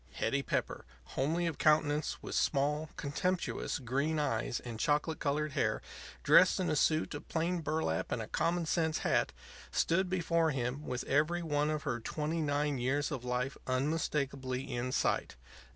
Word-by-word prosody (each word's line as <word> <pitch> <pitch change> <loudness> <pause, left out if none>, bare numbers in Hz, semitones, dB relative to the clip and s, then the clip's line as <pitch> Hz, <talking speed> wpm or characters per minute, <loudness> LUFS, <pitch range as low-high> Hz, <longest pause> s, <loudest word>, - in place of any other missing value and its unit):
Hetty 140 - 0
Pepper, - - -2 0.3
homely 160 +6 0
of 165 -3 -2
countenance, 150 -1 +2
with - - -5
small, 150 +2 +1
contemptuous, 175 +6 -1
green 140 +4 -1
eyes 120 -5 0
and 115 -3 -7
chocolate 150 +2 +1
colored 150 +1 0
hair, - - +1 0.4
dressed - - +6
in 185 - 0
a - - +1
suit 155 +2 +2
of 145 - -7
plain 170 +2 0
burlap 155 - -1
and - - 0
a - - -3
common 170 0 0
sense 160 -1 +1
hat, - - +2 0.4
stood 185 +2 +1
before 170 -3 +2
him 135 +1 -2
with 125 -1 -2
every 155 +5 +1
one 150 -1 +1
of 155 -2 -2
her 120 - -1
twenty 155 +7 -2
nine 145 -2 0
years 140 +5 0
of 130 -5 -4
life 125 +2 -1
unmistakably 135 -1 -1
in 125 +1 -2
sight. - - 0
150 Hz, 160 wpm, -33 LUFS, 135-160 Hz, 0.4 s, dressed